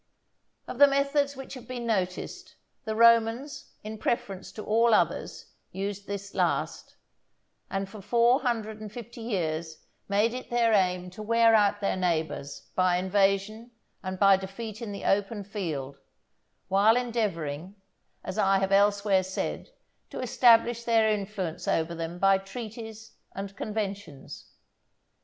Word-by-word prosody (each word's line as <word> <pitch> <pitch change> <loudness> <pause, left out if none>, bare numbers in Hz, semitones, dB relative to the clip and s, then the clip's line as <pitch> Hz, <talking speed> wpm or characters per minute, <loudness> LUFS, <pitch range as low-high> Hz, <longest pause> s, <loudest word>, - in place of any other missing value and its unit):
Of 250 - -7
the 285 - +9
methods 280 0 +1
which 270 0 -9
have 255 -3 -10
been 245 -2 -5
noticed, 190 -5 -3 0.3
the 220 -1 -2
Romans, 230 +4 +3
in 215 0 -7
preference 195 -5 -2
to 215 - -8
all 230 +1 +4
others, - - -1 0.2
used 200 +1 -5
this 200 0 -6
last; - - -1 0.7
and 195 0 -2
for 210 +1 -11
four 235 +5 +3
hundred 220 -4 -2
and 215 -1 -7
fifty 235 +1 -9
years 165 -7 -3 0.3
made 210 +3 +2
it 255 - -7
their 235 -2 +2
aim 180 -2 +1
to 200 - -9
wear 230 +1 +4
out 205 -1 +3
their 200 - 0
neighbours 160 -5 -2
by 185 -1 +2
invasion 195 +4 0 0.3
and 185 0 -5
by 195 0 +6
defeat 205 +3 -7
in 225 -3 -5
the 200 - -7
open 205 +1 0
field, 155 -9 -5 0.7
while 205 +4 +4
endeavouring, 195 -8 -2 0.5
as 190 - -5
I 195 0 +4
have 195 0 -1
elsewhere 200 -1 +3
said, 185 +1 -4 0.4
to - - -7
establish 235 -1 +4
their 225 -2 +3
influence 200 -5 -3
over 165 +1 0
them 165 +1 -5
by 195 +1 +4
treaties 220 +2 -8 0.2
and 195 0 -6
conventions. 200 -9 -6
205 Hz, 140 wpm, -27 LUFS, 190-230 Hz, 0.7 s, the